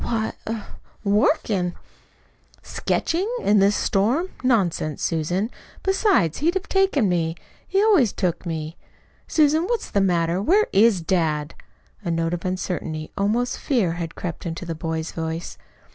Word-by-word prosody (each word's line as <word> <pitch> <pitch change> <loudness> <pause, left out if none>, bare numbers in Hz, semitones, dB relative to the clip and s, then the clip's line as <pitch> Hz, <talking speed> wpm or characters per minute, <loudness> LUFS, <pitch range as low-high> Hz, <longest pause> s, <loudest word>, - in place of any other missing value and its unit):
"Why, 220 -2 -1 0.2
er 225 -1 -3 0.4
working." 200 - +1 0.9
"Sketching? 365 +6 -1
in 205 0 +4
this 200 +1 +4
storm? 245 - +1
Nonsense, 180 - +1
Susan! 175 +7 0 0.3
Besides, 385 - +2
he'd 335 +5 +1
have 380 +1 -2
taken 385 - +2
me. 165 -2 0 0.3
He 390 +1 +2
always 360 - +4
took 180 -4 -1
me. 160 -2 -4 0.5
Susan, 310 +2 +3
what's 470 +3 -2
the 200 - +2
matter? 175 -1 +1
Where 395 - +4
IS 200 -2 +5
dad?" 160 -3 0 0.5
A 175 - -3
note 165 0 0
of 175 0 -4
uncertainty, 180 -4 -3
almost 220 +5 0
fear, 230 - +1
had 165 -1 -5
crept 175 0 -5
into 170 +2 -5
the 170 - -3
boy's 160 0 -3
voice. 160 +1 -5
190 Hz, 140 wpm, -23 LUFS, 165-245 Hz, 0.9 s, IS